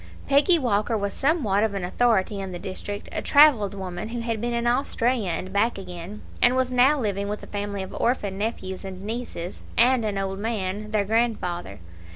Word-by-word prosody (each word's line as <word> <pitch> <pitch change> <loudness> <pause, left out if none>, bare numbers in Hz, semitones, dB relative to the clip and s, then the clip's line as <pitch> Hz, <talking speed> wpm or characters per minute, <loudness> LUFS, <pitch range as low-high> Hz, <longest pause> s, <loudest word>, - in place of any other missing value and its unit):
Peggy 285 +6 +5
Walker 225 -4 +1
was 200 -1 -2
somewhat 260 - +1
of 215 -2 0
an 195 - -3
authority 205 0 +1
in 190 -1 -5
the - - -4
district 200 +2 -6
a - - -3
travelled 255 -10 +5
woman, 190 +1 -5
who 235 0 -4
had 230 -2 -2
been 240 0 -1
in 235 0 -1
Australia 240 -3 +1
and 185 +3 -4
back 215 +3 +2
again, 180 +2 -8 0.2
and 245 +1 +5
was 260 -1 +1
now 255 +4 +5
living 200 -4 -1
with 210 +1 -4
a - - -6
family 205 -1 -4
of 190 - -9
orphan 210 -5 0
nephews 195 -3 -4
and 190 -1 -7
nieces, 215 -5 -5 0.2
and 245 +1 +5
an 210 -2 -1
old 195 0 -2
man, 210 -1 -3
their 210 -2 +1
grandfather. 195 - -1
210 Hz, 190 wpm, -25 LUFS, 195-240 Hz, 0.2 s, Peggy